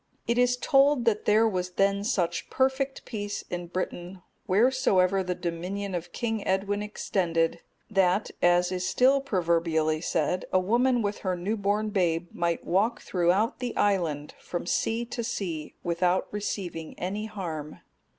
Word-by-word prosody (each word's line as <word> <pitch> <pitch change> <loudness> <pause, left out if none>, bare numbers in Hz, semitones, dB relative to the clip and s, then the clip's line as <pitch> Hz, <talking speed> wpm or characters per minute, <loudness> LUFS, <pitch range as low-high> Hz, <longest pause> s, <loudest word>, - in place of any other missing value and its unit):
It 235 +1 +1
is 245 0 +3
told 275 -1 +3
that 215 -2 +1
there 220 +2 +5
was 180 -3 -2
then 200 +1 +2
such 195 -7 -1
perfect 265 +1 0
peace 205 -3 -4
in 175 -1 -4
Britain, 180 0 -5 0.2
wheresoever 195 -4 +3
the 180 -1 -2
dominion 180 +3 -4
of 175 0 -4
King 225 -1 -2
Edwin 200 +2 0
extended, 175 -5 0 0.3
that, 195 -1 +2
as 175 +1 +4
is 185 0 -1
still 265 +6 +4
proverbially 165 - +1
said, 165 +2 0
a 185 - +4
woman 240 +5 +2
with 205 0 -2
her 185 -2 -1
new 195 +6 -1
born 205 +1 0
babe 175 -4 0
might 170 -1 -1
walk 210 +6 +1
throughout 185 +5 +1
the 250 -2 -4
island, 170 -8 0
from 175 - -5
sea 225 +6 0
to 235 0 -4
sea, 175 -9 -4
without 175 +2 +1
receiving 190 -6 -4
any 205 +4 -3
harm. 165 -8 -6
190 Hz, 150 wpm, -27 LUFS, 175-220 Hz, 0.3 s, there